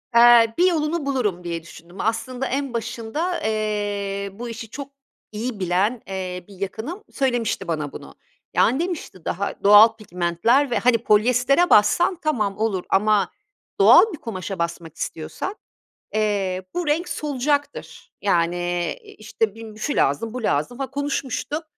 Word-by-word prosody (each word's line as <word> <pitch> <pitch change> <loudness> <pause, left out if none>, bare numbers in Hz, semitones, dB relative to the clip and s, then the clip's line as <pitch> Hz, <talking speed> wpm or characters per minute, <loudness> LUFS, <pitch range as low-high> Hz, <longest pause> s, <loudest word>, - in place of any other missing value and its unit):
Eee, 235 -1 +7
bir 360 +1 +5
yolunu 315 -2 -1
bulurum 220 -10 -1
diye 170 -1 -4
düşündüm. 170 +2 -11
Aslında 240 +4 -2
en 275 -1 -2
başında, 235 - -3
eee, 205 -2 -2
bu 235 +4 -7
işi 230 -1 -7
çok 280 +4 -8 0.4
iyi 220 +1 -4
bilen, 190 +6 0
eee, 185 -2 -5
bir 200 - -14
yakınım 230 - -5
söylemişti 240 -7 -1
bana 155 -4 -2
bunu. - - -11 0.4
Yani 260 +5 +3
demişti 330 - -5
daha 200 +3 -3
doğal 210 +3 +8
pigmentler 215 +7 +1
ve, - - +2
hani, 245 -1 +4
polyestere 250 +8 +3
bassan 345 - +4
tamam 215 -11 -1
olur 210 -4 -1
ama 210 +1 +2 0.5
doğal 445 - +7
bir - - -6
kumaşa 195 -6 -6
basmak 170 -1 -4
istiyorsan, 165 - -5 0.6
eee, 200 -4 0
bu 355 -3 -2
renk 320 +4 0
solacaktır. 285 0 -2
Yani, 175 -3 +2
eee, 175 -2 -2
i - - -14
işte 215 0 -2
bi 225 -1 -10
şu 285 +7 -2
lazım 180 +12 +1
bu 250 -2 -5
lazım, 180 - -1
ha, 270 - -4
konuşmuştuk. 285 +2 -3
220 Hz, 145 wpm, -22 LUFS, 195-270 Hz, 0.6 s, doğal